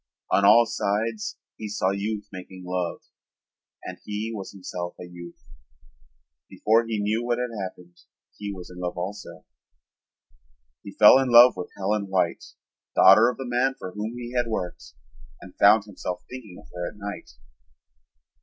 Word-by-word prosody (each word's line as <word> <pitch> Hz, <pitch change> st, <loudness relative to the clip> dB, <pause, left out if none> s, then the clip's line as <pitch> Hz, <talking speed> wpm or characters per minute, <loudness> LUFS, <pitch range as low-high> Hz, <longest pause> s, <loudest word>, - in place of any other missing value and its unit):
On 100 Hz, -, +3 dB
all 110 Hz, +4 st, +7 dB
sides 110 Hz, 0 st, -2 dB, 0.2 s
he 110 Hz, -, -6 dB
saw 95 Hz, -2 st, 0 dB
youth 105 Hz, +1 st, -3 dB
making 95 Hz, 0 st, -10 dB
love 90 Hz, -1 st, -3 dB, 0.8 s
and -, -, -8 dB
he 105 Hz, +2 st, -4 dB
was 100 Hz, -3 st, -7 dB
himself 90 Hz, -2 st, -6 dB
a -, -, -7 dB
youth. 85 Hz, -1 st, -12 dB, 1.0 s
Before 115 Hz, +1 st, +2 dB
he 110 Hz, -1 st, -2 dB
knew 110 Hz, +3 st, 0 dB
what 120 Hz, 0 st, 0 dB
had 125 Hz, -1 st, -3 dB
happened 90 Hz, -2 st, -9 dB, 0.4 s
he 105 Hz, -1 st, -6 dB
was 90 Hz, -2 st, -9 dB
in 90 Hz, -, -11 dB
love 90 Hz, 0 st, -4 dB
also. 100 Hz, +4 st, -7 dB, 1.4 s
He 100 Hz, -, -10 dB
fell 105 Hz, +5 st, +8 dB
in 135 Hz, -1 st, 0 dB
love 120 Hz, 0 st, +9 dB
with 90 Hz, -1 st, -6 dB
Helen 100 Hz, +1 st, -1 dB
White, 90 Hz, -3 st, 0 dB, 0.5 s
daughter 110 Hz, +5 st, +7 dB
of 125 Hz, -, -5 dB
the 135 Hz, -, -5 dB
man 125 Hz, +2 st, +1 dB
for 95 Hz, -, -7 dB
whom 105 Hz, +4 st, -5 dB
he 120 Hz, 0 st, -7 dB
had 120 Hz, -1 st, +1 dB
worked, 90 Hz, -6 st, -5 dB, 0.4 s
and -, -, -13 dB
found 110 Hz, -1 st, +6 dB
himself 90 Hz, -3 st, -6 dB
thinking 115 Hz, -8 st, -10 dB
of -, -, -16 dB
her 90 Hz, 0 st, -4 dB
at -, -, -16 dB
night. 100 Hz, 0 st, -7 dB
105 Hz, 160 wpm, -25 LUFS, 90-115 Hz, 1.4 s, love